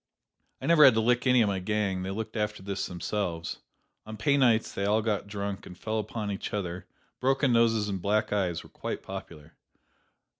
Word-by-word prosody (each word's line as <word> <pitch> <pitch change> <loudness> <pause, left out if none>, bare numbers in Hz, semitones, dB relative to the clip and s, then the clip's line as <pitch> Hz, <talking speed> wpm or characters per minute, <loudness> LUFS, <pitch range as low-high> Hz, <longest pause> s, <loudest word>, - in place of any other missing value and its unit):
I - - -6
never 165 -2 +6
had 130 -5 +8
to - - +3
lick 120 +3 +2
any 125 -2 +5
of - - +1
my 100 -1 0
gang: 95 -1 -1
they 95 - -4
looked 110 +3 -5
after 105 -2 -2
this 100 0 -3
themselves. 90 -2 -3 0.5
On 110 0 -7
pay 140 +5 +2
nights 120 -5 +3
they 100 - -3
all 105 +2 +2
got 105 -2 -1
drunk 100 -1 -4
and 90 - -11
fell 110 0 -2
upon 105 0 -4
each 100 - -4
other 90 -3 -4 0.3
broken 135 0 +2
noses 115 -2 +3
and 95 -3 -3
black 105 +2 +1
eyes 90 -5 0
were - - -15
quite - - -5
popular. 85 -5 -9
105 Hz, 195 wpm, -28 LUFS, 95-115 Hz, 0.5 s, had